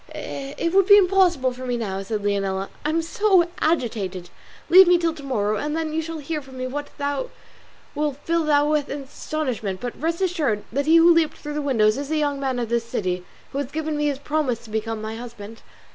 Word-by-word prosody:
"It 280 +5 -4
would 390 -1 +4
be 405 -1 +9
impossible 360 -9 +3
for 255 +1 -7
me 245 -1 0
now," 195 -4 -3
said 205 +1 -4
Leonela, 195 -1 -1
"I 300 - 0
am 325 +1 +1
so 385 -1 +3
agitated: 210 - -1 0.4
leave 370 +2 +8
me 355 0 +6
till 335 -1 0
to 310 - -11
morrow, 215 -6 -1
and 300 +5 -2
then 320 -1 -2
you 320 - 0
shall 325 0 -6
hear 305 +1 -4
from 265 -1 -13
me 255 - -3
what 290 +3 -4 1.0
will 295 -1 -1
fill 325 +3 -1
you 290 -1 +4
with 300 -1 0
astonishment; 265 -7 -4
but 245 -1 -4
rest 330 +2 -1
assured 315 - 0
that 280 +4 -1
he 320 - +6
who 335 +1 +7
leaped 330 -2 +1
through 295 - -6
the 300 - -2
window 260 -7 +2
is 270 +7 +1
a 315 - 0
young 290 -2 0
man 265 -2 -1
of 235 -2 -2
this 235 0 +1
city, 180 -6 -2 0.3
who 275 - -3
has 280 -3 -3
given 310 +1 -3
me 295 0 0
his 285 -2 -1
promise 285 -5 -1
to 220 - -13
become 220 0 -3
my 220 +1 -5
husband." 225 -2 -9
280 Hz, 220 wpm, -23 LUFS, 230-315 Hz, 1.0 s, be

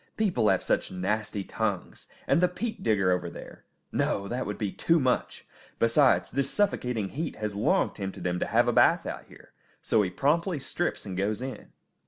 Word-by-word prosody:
People 190 - +2
have 95 - +2
such - - 0
nasty 100 +2 -2
tongues. 100 -2 -3 0.2
And - - +3
the 180 - +5
peat 220 +6 -5
digger 100 -5 +2
over 90 -1 0
there! - - -11 0.3
No, 100 0 0
that 125 +4 -3
would 105 - -4
be 105 -3 -2
too 165 0 +2
much! 130 -3 -1 0.3
Besides, 130 +4 +3
this 135 +1 0
suffocating 125 - 0
heat 160 +2 -4
has 105 -1 -3
long 100 +2 +2
tempted 95 -3 -6
him 90 0 0
to - - -1
have - - +3
a - - +2
bath - - +4
out - - -5
here, - - -17 0.3
so 110 - +2
he 95 - 0
promptly 160 - +1
strips 175 +5 -2
and 95 -2 -5
goes 100 +3 -1
in. 130 +1 -6
110 Hz, 190 wpm, -28 LUFS, 100-145 Hz, 0.3 s, the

